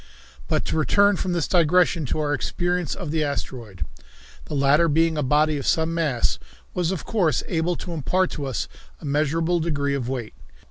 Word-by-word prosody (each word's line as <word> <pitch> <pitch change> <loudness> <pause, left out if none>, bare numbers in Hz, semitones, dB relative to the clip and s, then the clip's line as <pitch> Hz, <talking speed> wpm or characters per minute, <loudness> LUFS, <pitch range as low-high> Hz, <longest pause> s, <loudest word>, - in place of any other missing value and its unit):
But - - 0
to - - -1
return 200 +6 +4
from 180 0 -2
this 170 -3 0
digression 175 -2 +3
to - - -1
our 150 -1 0
experience 175 +3 -1
of 175 -6 -5
the 160 -1 +1
asteroid. 120 - -4 0.6
The 150 - -5
latter 140 +4 +4
being 165 +1 +2
a 150 - 0
body 150 +2 +2
of 135 - -5
some 160 0 +2
mass 130 - 0 0.3
was, 175 -2 0
of 190 - -4
course, 185 -8 +1
able 170 +1 0
to 175 - -6
impart 180 +4 +1
to 145 - -4
us 130 - -2 0.3
a - - -10
measurable 160 +4 +1
degree 145 -4 0
of 130 -3 -2
weight. 120 -5 -4
155 Hz, 185 wpm, -24 LUFS, 140-170 Hz, 0.6 s, return